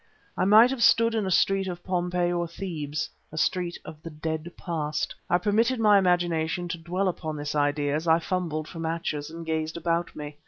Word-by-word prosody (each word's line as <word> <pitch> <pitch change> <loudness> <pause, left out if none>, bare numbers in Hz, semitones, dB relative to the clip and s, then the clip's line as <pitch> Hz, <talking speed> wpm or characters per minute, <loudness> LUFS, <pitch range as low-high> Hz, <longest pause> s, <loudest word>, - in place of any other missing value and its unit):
I - - +1
might 220 +5 +7
have 270 -3 -3
stood 230 0 +5
in 215 -3 0
a - - 0
street 195 +1 +2
of 175 -1 -6
Pompeii 180 -1 0
or 175 -1 -1
Thebes 160 -4 -4 0.2
a 155 - -9
street 175 +1 0
of 155 -1 -10
the 165 - -7
dead 160 +2 -4
past. 155 -4 -2 0.2
I 175 - +4
permitted 225 +6 +1
my 210 -2 +6
imagination 175 -2 +1
to 170 -1 -4
dwell 180 +4 -1
upon 155 -4 -3
this 145 0 -4
idea 145 -1 +1
as 160 +3 -2
I 160 0 +6
fumbled 165 -3 -2
for 165 - -9
matches 160 -2 -3
and 165 +1 -8
gazed 160 0 -2
about 170 0 -1
me. 150 0 -8
170 Hz, 200 wpm, -26 LUFS, 155-185 Hz, 0.2 s, might